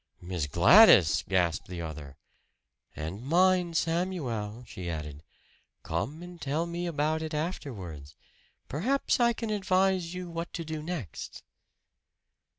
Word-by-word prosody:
"Miss 90 -4 -3
Gladys!" 90 - +7
gasped 90 -4 +1
the 90 -2 -6
other. 75 -4 -8 0.8
"And 85 +9 -6
mind, 175 +2 +3
Samuel!" 140 - -2
she 90 -5 -7
added. 75 -3 -5 0.6
"Come 155 +4 -3
and 175 -1 -11
tell 150 +4 -1
me 170 +1 -4
about 155 0 0
it 160 -1 -4
afterwards. 100 - -5 0.5
Perhaps 255 - 0
I 235 -1 +4
can 225 -1 -4
advise 190 -3 +1
you 180 0 -5
what 170 0 -5
to 165 - -4
do 155 -1 -4
next." 155 - -6
155 Hz, 125 wpm, -29 LUFS, -, 0.8 s, Gladys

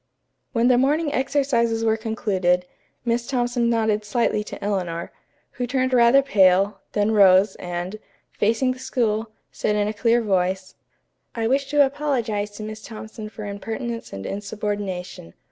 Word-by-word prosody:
When 235 -2 +2
the 250 -1 +5
morning 295 +3 +1
exercises 240 -5 +1
were 220 -1 +3
concluded, 190 -5 0 0.4
Miss 235 0 0
Thompson 245 -2 0
nodded 220 -2 +1
slightly 210 -1 0
to - - -8
Eleanor, 180 -5 -2 0.4
who 245 -2 -4
turned 260 +1 0
rather 245 +3 +6
pale, 195 -4 +3
then 210 +1 +1
rose, 195 -1 +5
and, 175 +3 -5 0.3
facing 230 +5 +1
the 255 - -6
school, 225 -4 -1 0.2
said 210 - -1
in 205 0 +1
a 210 - -2
clear 235 +2 +2
voice: 185 -2 0 0.6
"I 225 -1 0
wish 270 +3 +1
to 290 0 +5
apologize 245 -7 -1
to 215 - -6
Miss 215 0 -7
Thompson 220 -1 -8
for 215 -1 -8
impertinence 225 +4 -5
and 95 0 -7
insubordination. 200 - -4
220 Hz, 145 wpm, -23 LUFS, 205-245 Hz, 0.6 s, rather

